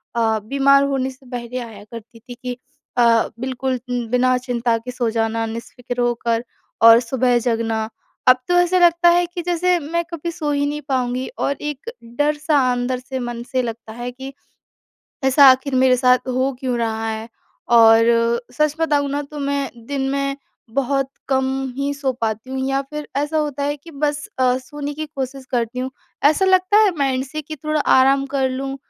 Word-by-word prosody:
अ, 220 Hz, -2 st, +1 dB
बीमार 275 Hz, +5 st, +3 dB
होने 270 Hz, -1 st, 0 dB
से 260 Hz, 0 st, -15 dB
पहले 245 Hz, +1 st, -4 dB
आया 220 Hz, -4 st, -9 dB
करती 230 Hz, 0 st, -11 dB
थी 245 Hz, +2 st, -11 dB
कि 250 Hz, -1 st, -4 dB, 0.4 s
अ, 235 Hz, -2 st, +4 dB
बिल्कुल 260 Hz, 0 st, -2 dB
उम, 245 Hz, -2 st, -2 dB
बिना 250 Hz, 0 st, +3 dB
चिंता 240 Hz, -2 st, -1 dB
के 250 Hz, +2 st, -7 dB
सो 245 Hz, -2 st, -1 dB
जाना, 225 Hz, 0 st, -1 dB
निश्फ़िक्र 240 Hz, +2 st, -5 dB
होकर 235 Hz, -1 st, 0 dB, 0.4 s
और 230 Hz, 0 st, +9 dB
सुबह 245 Hz, 0 st, +1 dB
जगना। 225 Hz, -2 st, -1 dB, 0.4 s
अब 255 Hz, 0 st, +8 dB
तो 355 Hz, -, +1 dB
ऐसा 355 Hz, +1 st, +3 dB
लगता 345 Hz, 0 st, +5 dB
है 350 Hz, +1 st, +4 dB
कि 350 Hz, 0 st, -6 dB
जैसे 355 Hz, +1 st, +1 dB
मैं 335 Hz, +3 st, -2 dB
कभी 335 Hz, +1 st, -4 dB
सो 305 Hz, -3 st, -3 dB
ही 285 Hz, 0 st, +1 dB
नहीं 295 Hz, +1 st, -3 dB
पाऊँगी 255 Hz, -1 st, -1 dB
और 280 Hz, -, 0 dB
एक 295 Hz, -, -5 dB, 0.3 s
डर-सा 300 Hz, +1 st, +1 dB
अंदर 245 Hz, +1 st, -1 dB
से 260 Hz, +1 st, -6 dB
मन 240 Hz, -1 st, -5 dB
से 255 Hz, -1 st, +1 dB
लगता 230 Hz, -2 st, -6 dB
है 240 Hz, +1 st, -5 dB
कि, 265 Hz, +2 st, -9 dB, 0.9 s
"ऐसा 265 Hz, +2 st, +6 dB
आखिर 260 Hz, +1 st, +1 dB
मेरे 255 Hz, 0 st, +4 dB
साथ 250 Hz, 0 st, +3 dB
हो 260 Hz, +2 st, 0 dB
क्यों 255 Hz, -2 st, -1 dB
रहा 225 Hz, -1 st, -2 dB
है?" 220 Hz, +1 st, -4 dB, 0.5 s
और 225 Hz, 0 st, +7 dB, 0.5 s
सच 305 Hz, -1 st, +1 dB
बताऊँ 290 Hz, -3 st, +1 dB
ना, 285 Hz, +1 st, -1 dB
तो 295 Hz, +1 st, -10 dB
मैं 280 Hz, -1 st, -1 dB, 0.2 s
दिन 275 Hz, -1 st, -2 dB
में 275 Hz, 0 st, -1 dB, 0.4 s
बहुत 275 Hz, 0 st, 0 dB, 0.2 s
कम 265 Hz, -1 st, +2 dB, 0.3 s
ही 280 Hz, +1 st, -1 dB
सो 275 Hz, -2 st, -1 dB
पाती 220 Hz, +2 st, -2 dB
हूँ 265 Hz, 0 st, -3 dB
या 270 Hz, 0 st, 0 dB
फिर 300 Hz, 0 st, -6 dB
ऐसा 295 Hz, +2 st, 0 dB
होता 290 Hz, -2 st, -2 dB
है 290 Hz, +1 st, -1 dB
कि 330 Hz, +4 st, -14 dB
बस 290 Hz, 0 st, -2 dB
अ, 255 Hz, -1 st, +3 dB
सोने 290 Hz, +2 st, -6 dB
की 310 Hz, +1 st, -5 dB
कोशिश 270 Hz, -2 st, -6 dB
करती 240 Hz, -1 st, -1 dB
हूँ। 260 Hz, +1 st, -2 dB, 0.3 s
ऐसा 310 Hz, +6 st, +4 dB
लगता 375 Hz, +2 st, +4 dB
है 400 Hz, -, +4 dB
माइंड 265 Hz, -1 st, 0 dB
से 305 Hz, +3 st, -6 dB
कि 310 Hz, +2 st, -8 dB
थोड़ा 305 Hz, +1 st, -1 dB, 0.2 s
आराम 270 Hz, +1 st, +4 dB
कर 265 Hz, -1 st, +2 dB
लूँ 270 Hz, +1 st, -4 dB
265 Hz, 185 wpm, -20 LUFS, 245-290 Hz, 0.9 s, और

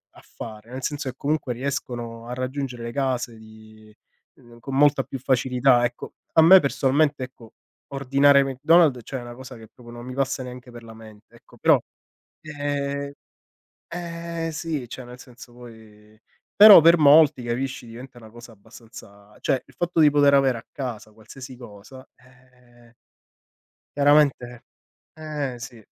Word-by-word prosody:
affare, 110 Hz, +1 st, -12 dB
nel 130 Hz, 0 st, -7 dB
senso 145 Hz, -2 st, -4 dB
che 125 Hz, -, -9 dB
comunque 145 Hz, -4 st, -2 dB
riescono 120 Hz, -3 st, -6 dB
a 125 Hz, -, -6 dB
raggiungere 130 Hz, -1 st, -5 dB
le 115 Hz, -, -6 dB
case 125 Hz, -4 st, -3 dB
di 110 Hz, -1 st, -17 dB, 0.4 s
ehm, 120 Hz, 0 st, -18 dB
con 135 Hz, +3 st, -7 dB
molta 145 Hz, -1 st, +3 dB
più 135 Hz, +1 st, -8 dB
facilità. 125 Hz, -1 st, +2 dB
Ecco, 120 Hz, 0 st, -7 dB, 0.2 s
a 160 Hz, -, +5 dB
me 185 Hz, +4 st, +8 dB
personalmente, 140 Hz, 0 st, 0 dB
ecco, 120 Hz, -3 st, -13 dB, 0.4 s
ordinare 140 Hz, +1 st, +3 dB
McDonald's 145 Hz, +1 st, +2 dB
cioè 135 Hz, -, -6 dB
è -, -, -9 dB
una 120 Hz, 0 st, -10 dB
cosa 130 Hz, 0 st, -11 dB
che 110 Hz, -1 st, -14 dB
proprio 120 Hz, -2 st, -15 dB
non 120 Hz, 0 st, -10 dB
mi 130 Hz, 0 st, -8 dB
passa 135 Hz, -1 st, -2 dB
neanche 125 Hz, 0 st, -11 dB
per 120 Hz, 0 st, -12 dB
la 115 Hz, -1 st, -12 dB
mente, 110 Hz, -1 st, -16 dB
ecco. -, -, -21 dB
Però, -, -, +3 dB, 0.6 s
ehm 140 Hz, -2 st, -4 dB, 0.8 s
ehm, 170 Hz, -1 st, -6 dB
sì, 155 Hz, -4 st, -5 dB
cioè 130 Hz, +1 st, -9 dB
nel 125 Hz, +1 st, -12 dB
senso 125 Hz, -1 st, -15 dB
poi 110 Hz, -3 st, -17 dB, 0.4 s
però 205 Hz, -4 st, +10 dB
per 170 Hz, +1 st, +5 dB
molti 145 Hz, -3 st, +5 dB
capisci, 125 Hz, +2 st, -4 dB
diventa 120 Hz, +2 st, -12 dB
una 110 Hz, -2 st, -15 dB
cosa 120 Hz, 0 st, -14 dB
abbastanza 105 Hz, -1 st, -16 dB
cioè 135 Hz, -, 0 dB
il -, -, -22 dB
fatto 175 Hz, -1 st, -3 dB
di 150 Hz, -, +6 dB
poter 145 Hz, -1 st, +3 dB
avere 135 Hz, -3 st, +3 dB
a -, -, -15 dB
casa 115 Hz, -6 st, -7 dB
qualsiasi 125 Hz, +4 st, -12 dB
cosa, 120 Hz, +2 st, -14 dB
ehm 125 Hz, -2 st, -24 dB, 1.0 s
chiaramente 140 Hz, -4 st, +2 dB, 0.5 s
eh, 150 Hz, -5 st, -5 dB
sì. 115 Hz, -2 st, -11 dB
130 Hz, 155 wpm, -23 LUFS, 120-140 Hz, 1.0 s, però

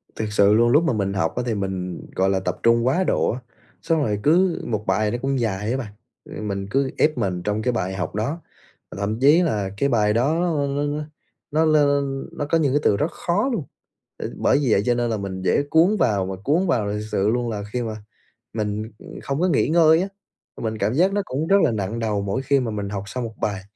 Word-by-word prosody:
Thiệt 110 Hz, -, -2 dB
sự 100 Hz, 0 st, +4 dB
luôn, 120 Hz, +2 st, +4 dB
lúc 150 Hz, +7 st, +4 dB
mà 165 Hz, -, +1 dB
mình 100 Hz, -3 st, -1 dB
học 95 Hz, -4 st, -1 dB
á 125 Hz, -, -1 dB
thì 115 Hz, -3 st, -1 dB
mình, 95 Hz, -3 st, -4 dB
gọi 95 Hz, +1 st, +2 dB
là, 95 Hz, -1 st, +1 dB
tập 90 Hz, -1 st, -3 dB
trung 115 Hz, 0 st, +4 dB
quá 145 Hz, +9 st, +2 dB
độ -, -, +1 dB
á. 120 Hz, -, -5 dB, 0.4 s
Xong 165 Hz, -2 st, +1 dB
rồi 105 Hz, -5 st, -1 dB
cứ 175 Hz, +3 st, +3 dB
một 110 Hz, -2 st, -3 dB
bài 105 Hz, -1 st, +1 dB
nó 120 Hz, -, -1 dB
cũng 135 Hz, 0 st, 0 dB
dài 105 Hz, -2 st, -1 dB
á 130 Hz, -, 0 dB
bạn, 120 Hz, -6 st, -6 dB, 0.3 s
rồi -, -, -8 dB
mình 100 Hz, -2 st, -3 dB
cứ 135 Hz, +3 st, 0 dB
ép 155 Hz, 0 st, +2 dB
mình 90 Hz, -2 st, -2 dB
trong 105 Hz, +2 st, -1 dB
cái 125 Hz, -, +1 dB
bài 95 Hz, -4 st, -2 dB
học 95 Hz, 0 st, -4 dB
đó, 140 Hz, +11 st, -2 dB, 0.6 s
thậm 105 Hz, +3 st, -2 dB
chí 145 Hz, +6 st, +6 dB
là 105 Hz, -, 0 dB
cái 140 Hz, +5 st, +1 dB
bài 105 Hz, -4 st, +2 dB
đó 160 Hz, +9 st, +1 dB
n 145 Hz, +1 st, -1 dB
n 150 Hz, -, -3 dB, 0.5 s
nó 155 Hz, +2 st, +2 dB
n 140 Hz, -3 st, +1 dB
nó 145 Hz, -, -1 dB
có 155 Hz, +3 st, +2 dB
những 145 Hz, -5 st, +1 dB
cái 145 Hz, -, +3 dB
từ 100 Hz, -, +3 dB
rất 150 Hz, +8 st, -1 dB
khó 200 Hz, +10 st, 0 dB
luôn, 215 Hz, -, -2 dB, 0.5 s
ừm, -, -, -5 dB
bởi -, -, +3 dB
vì 135 Hz, -5 st, +1 dB
vậy 100 Hz, -, +4 dB
cho 125 Hz, -, +3 dB
nên 120 Hz, 0 st, 0 dB
là 110 Hz, -, -1 dB
mình 95 Hz, -2 st, -5 dB
dễ 95 Hz, -, +2 dB
cuốn 175 Hz, +8 st, +4 dB
vào 100 Hz, -, +1 dB
và 95 Hz, 0 st, -4 dB
cuốn 165 Hz, -, +2 dB
vào. 115 Hz, -11 st, +1 dB
Thì -, -, -2 dB
thực 105 Hz, -, -5 dB
sự 95 Hz, -, +1 dB
luôn 120 Hz, +1 st, 0 dB
là 105 Hz, -2 st, -4 dB
khi 125 Hz, -, -1 dB
mà 110 Hz, -2 st, -4 dB, 0.6 s
mình, 110 Hz, 0 st, -3 dB
ưm, -, -, -11 dB
không 140 Hz, +2 st, -2 dB
có 180 Hz, -, +2 dB
nghỉ 160 Hz, -, +2 dB
ngơi 160 Hz, +1 st, +5 dB
á, 195 Hz, -, -3 dB, 0.5 s
mình 110 Hz, -1 st, -2 dB
cảm 105 Hz, +3 st, 0 dB
giác 180 Hz, +7 st, +3 dB
nó 205 Hz, 0 st, 0 dB
cũng 145 Hz, 0 st, -3 dB
rất 195 Hz, -, +5 dB
là -, -, +3 dB
nặng 105 Hz, +1 st, -3 dB
đầu 110 Hz, -3 st, -1 dB
mỗi 100 Hz, +7 st, -2 dB
khi 140 Hz, +1 st, +2 dB
mà 120 Hz, -3 st, -2 dB
mình 105 Hz, -2 st, -4 dB
học 100 Hz, -1 st, -4 dB
xong 125 Hz, +4 st, -4 dB
một 115 Hz, -1 st, -6 dB
bài. 100 Hz, -2 st, -2 dB
115 Hz, 255 wpm, -22 LUFS, 105-145 Hz, 0.6 s, chí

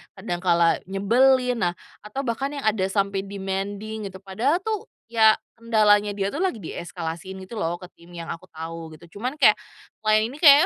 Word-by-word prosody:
kadang 185 Hz, -3 st, -4 dB
kala 170 Hz, -2 st, +3 dB
nyebelin, 250 Hz, +6 st, +3 dB
nah 175 Hz, -3 st, +1 dB, 0.3 s
atau 210 Hz, +7 st, -5 dB
bahkan 270 Hz, +4 st, -2 dB
yang 280 Hz, -, -5 dB
ada 210 Hz, -3 st, +2 dB
sampai 200 Hz, 0 st, 0 dB
demanding 200 Hz, +2 st, -4 dB
gitu. 190 Hz, -1 st, -9 dB
Padahal 250 Hz, -, 0 dB
tuh 435 Hz, -1 st, -2 dB, 0.2 s
ya 220 Hz, -2 st, +5 dB, 0.2 s
kendalanya 210 Hz, -3 st, +3 dB
dia 195 Hz, 0 st, -1 dB
tuh 300 Hz, -, -2 dB
lagi 375 Hz, -10 st, +1 dB
dieskalasiin 175 Hz, 0 st, -6 dB
gitu 185 Hz, -, -12 dB
loh, 175 Hz, -4 st, -1 dB
ke 180 Hz, -, -10 dB
tim 170 Hz, +1 st, -19 dB
yang 170 Hz, -1 st, -7 dB
aku 165 Hz, -, -7 dB
tau 165 Hz, 0 st, -7 dB
gitu, 160 Hz, +2 st, -13 dB
cuman 255 Hz, +6 st, -3 dB
kayak, -, -, +7 dB, 0.5 s
client 215 Hz, 0 st, +4 dB
ini -, -, -9 dB
kayak, 295 Hz, 0 st, +9 dB
205 Hz, 180 wpm, -24 LUFS, 185-235 Hz, 0.5 s, kayak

